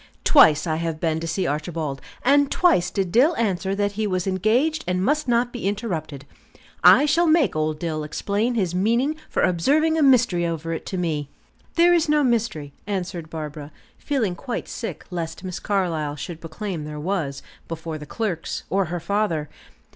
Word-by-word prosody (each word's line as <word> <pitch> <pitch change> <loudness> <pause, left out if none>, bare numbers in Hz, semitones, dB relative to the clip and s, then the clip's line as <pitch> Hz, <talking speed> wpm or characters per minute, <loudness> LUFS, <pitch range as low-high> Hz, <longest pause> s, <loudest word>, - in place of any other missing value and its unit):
Twice 155 - +6
I 160 -2 -1
have 165 -1 -3
been 160 -1 0
to 165 - -4
see 170 +3 -1
Archibald, 150 -2 -3 0.2
and 285 +1 +4
twice 185 - +3
did 190 -3 -2
Dill 280 - +4
answer 195 -3 -1
that 205 0 0
he 210 +1 -2
was 185 -2 -1
engaged 230 - +1
and 180 +1 0
must 300 +1 +1
not 240 0 +1
be 240 -5 -3
interrupted. 165 - -3 0.6
I 290 - +8
shall 335 +3 +3
make 315 - +3
old 155 0 0
Dill 155 -1 -3
explain 205 +10 -1
his 185 -6 0
meaning 235 +11 +1
for - - 0
observing 300 - +2
a - - +2
mystery 250 -10 +4
over 165 -1 -2
it 160 - -6
to 190 - -3
me." 155 -5 -2 0.5
"There 345 +1 +5
is 335 -3 +2
no 300 -1 +3
mystery," 220 - -1
answered 180 -5 -4
Barbara, 150 -2 -7 0.3
feeling 250 -10 -1
quite 245 +4 -5
sick 230 - -6
lest 170 0 -5
Miss 185 -2 -5
Carlyle 165 -7 -1
should 155 +3 -7
proclaim 165 +1 -5
there 150 0 -6
was, 155 -5 -2 0.2
before 160 -1 -5
the 150 - -9
clerks, 200 -6 -3
or 195 +1 +2
her 175 +1 -4
father. 170 -4 -1
185 Hz, 175 wpm, -23 LUFS, 160-235 Hz, 0.6 s, I